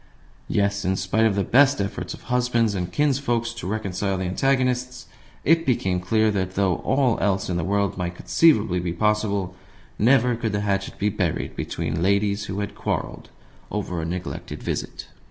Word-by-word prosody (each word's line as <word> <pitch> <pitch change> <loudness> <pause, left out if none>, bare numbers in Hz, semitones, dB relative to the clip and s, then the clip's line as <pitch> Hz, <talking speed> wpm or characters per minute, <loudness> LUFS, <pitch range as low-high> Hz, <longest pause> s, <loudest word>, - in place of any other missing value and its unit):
Yes, 100 0 0
in 95 +1 +1
spite 95 +4 +2
of 105 - 0
the 100 - +1
best 135 +3 +4
efforts 100 +2 -3
of - - -17
husbands 125 -3 +1
and 90 -2 -3
kinsfolk 135 -5 +1
to 115 - -6
reconcile 100 -2 -2
the 95 - -2
antagonists, 125 +4 0 0.4
it 165 +2 +4
became 95 - +1
clear 110 +4 +2
that, 95 -2 -2
though 95 -3 +2
all 130 -3 +1
else 95 -2 0
in 90 - 0
the 90 - -1
world 100 +1 0
might 90 0 -3
conceivably 110 - +3
be 85 -1 -2
possible, 100 -2 0 0.4
never 125 +1 +4
could 115 -2 -2
the 105 - 0
hatchet 100 -1 -2
be 105 - +1
buried 90 -5 -2
between 80 +2 -3
ladies 100 +2 +1
who 100 +1 -3
had 100 - -4
quarrelled - - -4 0.4
over 90 -5 -3
a - - -3
neglected 90 +1 -5
visit. - - -4
100 Hz, 170 wpm, -24 LUFS, 95-120 Hz, 0.4 s, best